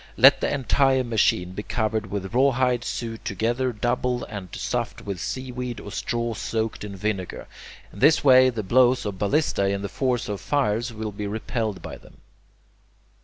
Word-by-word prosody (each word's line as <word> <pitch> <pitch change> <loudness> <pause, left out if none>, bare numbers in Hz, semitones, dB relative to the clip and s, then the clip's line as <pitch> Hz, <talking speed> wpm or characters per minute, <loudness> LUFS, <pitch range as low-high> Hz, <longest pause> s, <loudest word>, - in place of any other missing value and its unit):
Let - - +7
the - - 0
entire 135 -1 +2
machine 105 -6 +1
be 95 - -5
covered 110 -1 -1
with 95 0 -4
rawhide 125 -2 +2
sewed 115 -1 -5
together 120 +6 -1
double 125 +2 -1
and 100 -4 -7
stuffed - - -3
with 100 -3 -5
seaweed 125 -2 -4
or 105 - -9
straw 120 +2 -2
soaked 110 0 -3
in 100 -1 -6
vinegar. 95 -2 -3 0.5
In 100 - -11
this 150 +6 +5
way 130 -2 +7
the 115 -4 -4
blows 125 +4 +3
of 100 -2 -4
ballistae 100 -3 +1
and 100 0 -2
the 100 - -3
force 125 -3 -1
of 100 -2 -4
fires 120 0 0
will 110 -1 -5
be 105 0 -5
repelled 110 -1 -3
by - - -7
them. - - -19
115 Hz, 170 wpm, -24 LUFS, 105-125 Hz, 0.5 s, Let